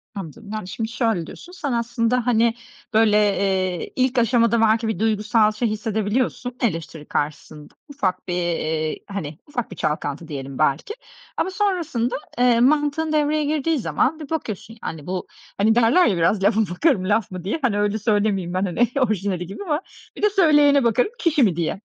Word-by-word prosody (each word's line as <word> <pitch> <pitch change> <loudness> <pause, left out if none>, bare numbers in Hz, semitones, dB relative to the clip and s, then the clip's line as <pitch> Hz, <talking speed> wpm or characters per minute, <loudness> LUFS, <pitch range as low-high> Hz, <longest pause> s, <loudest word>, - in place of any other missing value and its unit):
Anladım. 200 +3 -8
Yani, 215 -4 -4
şimdi 220 +4 -4
şöyle 225 -8 0
diyorsun, 355 - -11
sen 310 -6 -4
aslında, 235 +1 0
hani, 235 -1 +3 0.4
böyle, 215 -1 +4
eee, 190 -3 0
ilk 260 0 +1
aşamada 230 -1 +3
belki 225 +1 +3
bir 220 -5 -2
duygusal 215 0 +2
şey 215 +3 -1
hissedebiliyorsun, 220 +3 -2
eleştiri 165 -7 -2
karşısında. 150 0 -4 0.2
Ufak 190 -11 -2
bir, 180 - -2
eee, 160 -3 -1
hani, 160 -7 -5
ufak 245 -7 -4
bir - - -7
çalkantı, 150 0 -3
diyelim 135 -3 -6
belki. 155 - 0 0.4
Ama - - 0
sonrasında, 345 - -1 0.2
eee, 245 -2 +4
mantığın 295 +4 +2
devreye 300 0 +1
girdiği 305 +1 0
zaman 275 +6 0
bir 300 -3 -8
bakıyorsun, 225 - -5
yani, 155 -3 -6
bu, 185 0 -3 0.3
hani 220 +3 +3
derler 240 +10 +5
ya, 195 -6 +1
"Biraz 190 +4 +2
lafa 210 +2 +3
bakarım 195 - +1
laf 210 -2 +1
mı 185 -2 -6
diye," 200 - -2
hani, 225 -6 +1
öyle 205 +1 +1
söylemeyeyim 205 -4 0
ben, 185 +2 0
hani, 210 +6 +1
orijinali 200 -7 0
gibi 195 - -7
ama 310 -4 -1 0.4
"Bir - - -7
de 420 - +5
söyleyene 295 -8 +4
bakarım 240 - +2
kişi 305 -5 +3
mi 195 -7 +3
diye," 170 +4 -2
220 Hz, 175 wpm, -22 LUFS, 185-255 Hz, 0.4 s, derler